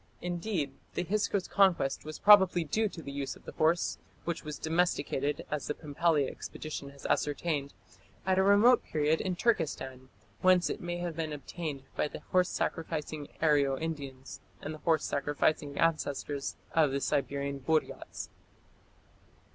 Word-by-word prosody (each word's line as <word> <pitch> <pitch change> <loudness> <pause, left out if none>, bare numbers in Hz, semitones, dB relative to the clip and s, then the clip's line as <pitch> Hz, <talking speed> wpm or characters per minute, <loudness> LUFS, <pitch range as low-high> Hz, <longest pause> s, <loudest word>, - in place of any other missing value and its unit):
Indeed 175 -5 -2 0.2
the - - 0
Hyksos 200 0 0
conquest 175 -10 +2
was 155 0 -6
probably 190 -4 +7
due 215 +8 0
to 165 -4 -9
the 140 - -6
use 140 -1 -3
of - - -18
the - - -7
horse, 165 +2 +1 0.3
which 170 -1 -2
was 150 -1 -5
domesticated, 155 -4 0
as 150 -2 -2
the 150 - -2
Pumpelly 150 -1 +1
expedition 150 -1 -6
has 140 0 -14
ascertained, 145 -1 0 0.5
at 190 0 +3
a - - +5
remote 210 +5 +6
period 155 +1 +1
in 185 -2 -1
Turkestan, 135 - -1 0.3
whence 185 -1 +4
it - - -5
may 175 0 -3
have 175 -2 -4
been 160 -1 -2
obtained 150 -1 -5
by - - +1
the - - -9
horse 180 -1 +4
sacrificing 155 -2 -3 0.2
Aryo 140 -3 +4
Indians 140 -5 -5 0.2
and 155 - -5
the 155 - -9
horse 160 -2 +2
sacrificing 145 0 0
ancestors 145 -3 0 0.2
of 160 -3 +4
the 135 +1 -1
Siberian 140 0 -1
Buriats. 155 +4 -2
155 Hz, 150 wpm, -31 LUFS, 140-175 Hz, 0.5 s, probably